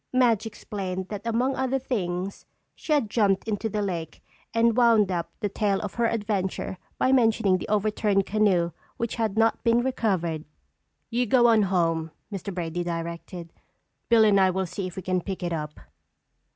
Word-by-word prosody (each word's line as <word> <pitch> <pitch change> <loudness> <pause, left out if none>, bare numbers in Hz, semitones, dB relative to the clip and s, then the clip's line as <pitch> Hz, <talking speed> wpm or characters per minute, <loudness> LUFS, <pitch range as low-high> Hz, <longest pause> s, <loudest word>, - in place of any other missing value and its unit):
Madge 235 -4 +3
explained 190 -3 -5
that 205 -2 -5
among 245 +4 +1
other 265 0 0
things 195 -7 -3 0.3
she - - -7
had 290 -7 +3
jumped 205 -2 +1
into 220 +1 -1
the 210 0 -1
lake 170 -5 -4 0.3
and 230 0 +3
wound 230 -5 +4
up 170 -2 -2
the 210 - +1
tale 200 -1 0
of 205 - -5
her 235 -1 +1
adventure 205 -4 -2 0.2
by 260 - +2
mentioning 225 -7 +3
the - - -6
overturned 210 -1 +1
canoe 190 -5 +2 0.3
which 235 +1 -3
had 220 -2 -1
not 225 0 +2
been 235 +1 +3
recovered. 185 -11 -1 0.7
"You 245 +1 +1
go 240 +2 +4
on 225 -2 +5
home," 165 -4 +1 0.2
Mr. 200 +1 -4
Brady 175 -1 -3
directed. 170 0 -5 0.6
"Bill 230 -2 +6
and 200 -2 +5
I 190 -1 +5
will 190 +1 -1
see 185 +2 -4
if 180 - -9
we 190 - -6
can 185 0 0
pick 190 0 -5
it 175 -1 -1
up." 150 -2 -5
200 Hz, 175 wpm, -26 LUFS, 180-230 Hz, 0.7 s, Bill